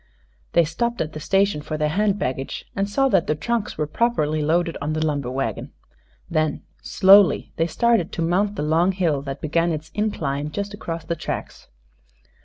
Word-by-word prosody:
They 170 Hz, -, +5 dB
stopped 235 Hz, +10 st, -2 dB
at 155 Hz, 0 st, -2 dB
the 155 Hz, -, -6 dB
station 195 Hz, 0 st, +1 dB
for 155 Hz, +1 st, -4 dB
their 150 Hz, 0 st, +1 dB
hand 200 Hz, +4 st, +1 dB
baggage, 130 Hz, -5 st, -3 dB
and 195 Hz, 0 st, -1 dB
saw 270 Hz, +6 st, +2 dB
that 170 Hz, -, +2 dB
the 150 Hz, -, +1 dB
trunks 235 Hz, +7 st, -2 dB
were 150 Hz, -, 0 dB
properly 155 Hz, -4 st, 0 dB
loaded 165 Hz, +3 st, +1 dB
on 150 Hz, +2 st, -2 dB
the 155 Hz, 0 st, 0 dB
lumber 145 Hz, -5 st, -1 dB
wagon. 130 Hz, +2 st, -3 dB, 0.5 s
Then, 155 Hz, -1 st, -1 dB, 0.2 s
slowly, 195 Hz, -1 st, +5 dB
they 165 Hz, -, +1 dB
started 230 Hz, -2 st, +1 dB
to 165 Hz, -, -1 dB
mount 195 Hz, +5 st, +1 dB
the 150 Hz, -, -2 dB
long 165 Hz, +5 st, +2 dB
hill 165 Hz, -7 st, 0 dB
that 140 Hz, 0 st, -6 dB
began 165 Hz, +2 st, +1 dB
its 155 Hz, 0 st, -5 dB
incline 150 Hz, -9 st, -2 dB
just 200 Hz, +4 st, -4 dB
across 165 Hz, -5 st, -5 dB
the 170 Hz, -, -2 dB
tracks. 160 Hz, -, -6 dB
165 Hz, 185 wpm, -22 LUFS, 150-200 Hz, 0.5 s, They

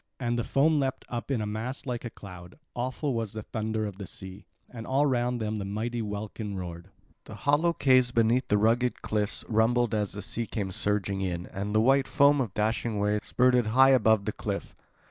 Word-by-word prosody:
And 120 Hz, -2 st, -1 dB
the -, -, 0 dB
foam 150 Hz, +5 st, +2 dB
leapt 135 Hz, -2 st, -2 dB
up 120 Hz, -1 st, -5 dB
in 130 Hz, -5 st, 0 dB
a -, -, -2 dB
mass 110 Hz, +5 st, -4 dB
like 125 Hz, -3 st, -3 dB
a 120 Hz, -, -4 dB
cloud; 90 Hz, -4 st, -12 dB, 0.2 s
awful 130 Hz, +3 st, -2 dB
was 115 Hz, -3 st, -3 dB
the 110 Hz, -1 st, -6 dB
thunder 110 Hz, 0 st, -2 dB
of 100 Hz, -1 st, -7 dB
the 100 Hz, -, -6 dB
sea; 95 Hz, +3 st, -9 dB, 0.2 s
and 115 Hz, -2 st, -9 dB
all 135 Hz, +3 st, +2 dB
round 125 Hz, -2 st, 0 dB
them 110 Hz, -1 st, -2 dB
the -, -, -3 dB
mighty 110 Hz, +4 st, -3 dB
welkin 105 Hz, 0 st, -5 dB
roared. 85 Hz, 0 st, -7 dB, 0.4 s
The -, -, -9 dB
hollow 150 Hz, +4 st, +2 dB
caves 130 Hz, -5 st, +4 dB
beneath 115 Hz, +2 st, +2 dB
the 105 Hz, -, +3 dB
rugged 120 Hz, +4 st, +1 dB
cliffs 105 Hz, -1 st, -2 dB
rumbled 115 Hz, +1 st, +2 dB
as 105 Hz, -2 st, -1 dB
the 100 Hz, 0 st, -5 dB
sea 115 Hz, +2 st, -3 dB
came 100 Hz, -4 st, -3 dB
surging 100 Hz, 0 st, -1 dB
in; 90 Hz, -2 st, -2 dB
and 100 Hz, +2 st, -4 dB
the 110 Hz, -, +5 dB
white 135 Hz, +3 st, +3 dB
foam 140 Hz, 0 st, +4 dB
of 115 Hz, -6 st, -2 dB
the 105 Hz, -, 0 dB
dashing 110 Hz, 0 st, -1 dB
wave 105 Hz, +1 st, 0 dB
spurted 125 Hz, -2 st, +3 dB
high 130 Hz, +5 st, +6 dB
above 110 Hz, -5 st, +4 dB
the -, -, -1 dB
cliff. -, -, -5 dB
110 Hz, 210 wpm, -28 LUFS, 105-125 Hz, 0.4 s, high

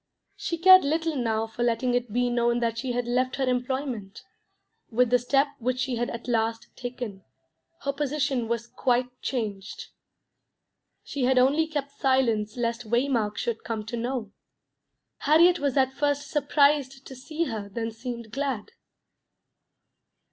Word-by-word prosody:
She 335 Hz, -, -3 dB
cared 370 Hz, +2 st, +8 dB
little 320 Hz, +2 st, 0 dB
now 225 Hz, -4 st, 0 dB
for 225 Hz, +2 st, -8 dB
letting 240 Hz, +1 st, +1 dB
it 245 Hz, -2 st, -1 dB
be 245 Hz, +2 st, +1 dB
known 240 Hz, 0 st, +2 dB
that 230 Hz, -1 st, -1 dB
she 245 Hz, +1 st, -2 dB
had 245 Hz, 0 st, -1 dB
left 255 Hz, +2 st, 0 dB
her 270 Hz, -1 st, -1 dB
employment; 250 Hz, -5 st, -2 dB, 0.7 s
with 245 Hz, +1 st, +2 dB
the 250 Hz, -, +5 dB
step 275 Hz, +4 st, +2 dB
which 250 Hz, +1 st, -1 dB
she 255 Hz, -1 st, -1 dB
had 240 Hz, +1 st, -1 dB
at 235 Hz, +1 st, -7 dB
last 225 Hz, -1 st, -1 dB
taken, 245 Hz, -6 st, -6 dB, 0.6 s
her 280 Hz, -, -1 dB
position 280 Hz, -4 st, -1 dB
was 235 Hz, 0 st, -2 dB
quite 250 Hz, +1 st, 0 dB
changed; 205 Hz, -6 st, -4 dB, 1.1 s
she 275 Hz, -4 st, -2 dB
had 260 Hz, 0 st, +3 dB
only 280 Hz, +6 st, +4 dB
kept 290 Hz, -3 st, -3 dB
silence 235 Hz, -6 st, +1 dB
lest 235 Hz, -1 st, -2 dB
Waymark 235 Hz, -4 st, +1 dB
should 235 Hz, -2 st, -2 dB
come 220 Hz, -2 st, -4 dB
to 230 Hz, +2 st, -4 dB
know. 235 Hz, -2 st, -3 dB, 0.9 s
Harriet 340 Hz, +4 st, +5 dB
was 280 Hz, -1 st, 0 dB
at 265 Hz, 0 st, +3 dB
first 290 Hz, 0 st, -1 dB
surprised 285 Hz, -2 st, +2 dB
to 265 Hz, -, -9 dB
see 310 Hz, +6 st, -3 dB
her 220 Hz, -9 st, -4 dB
then 225 Hz, +2 st, -3 dB
seemed 235 Hz, -1 st, -7 dB
glad. 270 Hz, -5 st, -3 dB
250 Hz, 150 wpm, -26 LUFS, 230-275 Hz, 1.1 s, cared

